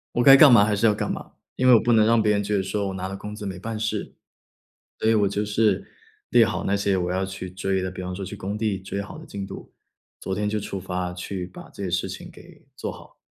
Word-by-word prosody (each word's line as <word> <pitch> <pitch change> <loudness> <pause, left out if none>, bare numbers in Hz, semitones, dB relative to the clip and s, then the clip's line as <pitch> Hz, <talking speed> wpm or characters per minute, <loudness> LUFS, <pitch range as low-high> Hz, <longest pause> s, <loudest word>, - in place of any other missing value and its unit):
我 120 - +3
该 135 +1 +10
干 145 -2 +9
嘛 115 -4 +8
还 105 0 +1
是 110 +3 +1
要 105 - +5
干 - - -2
嘛， - - -7 0.2
因 130 - +2
为 125 - +8
我 115 - +8
不 120 - +1
能 110 -2 +5
让 115 -1 +4
别 105 - +3
人 100 -1 +2
觉 105 +1 -1
得 95 - +1
说 100 +1 -2
我 95 - -4
拿 95 0 -4
了 95 - -6
工 105 +2 -7
资 105 - -7
没 95 -2 -5
办 115 +2 -5
事。 110 -1 -3 0.9
所 110 - +1
以 - - +4
我 105 -2 +3
就 100 +1 -1
是 110 - +1 0.5
列 115 -2 +6
好 95 0 -2
那 100 - +1
些 100 -1 +1
我 90 -1 -1
要 95 +1 0
去 95 -1 -6
追 95 +1 -1
的， 95 - -2
比 95 - -8
方 90 0 -4
说 95 +1 -5
去 105 +3 -7
工 100 +2 -4
地 105 -3 -1
追 100 +1 -5
好 105 - -10
多 160 - -11
进 100 -1 -6
度， 95 - -10 0.5
昨 95 - -4
天 105 +1 -1
就 105 0 -1
出 100 -1 -5
发 90 -1 -3
去 90 0 -5
把 90 - -12
这 - - -9
些 95 - -2
事 90 - -1
情 - - -8
给 - - -16
做 - - -4
好。 - - -15
100 Hz, 300 characters per minute, -24 LUFS, 95-110 Hz, 0.9 s, 该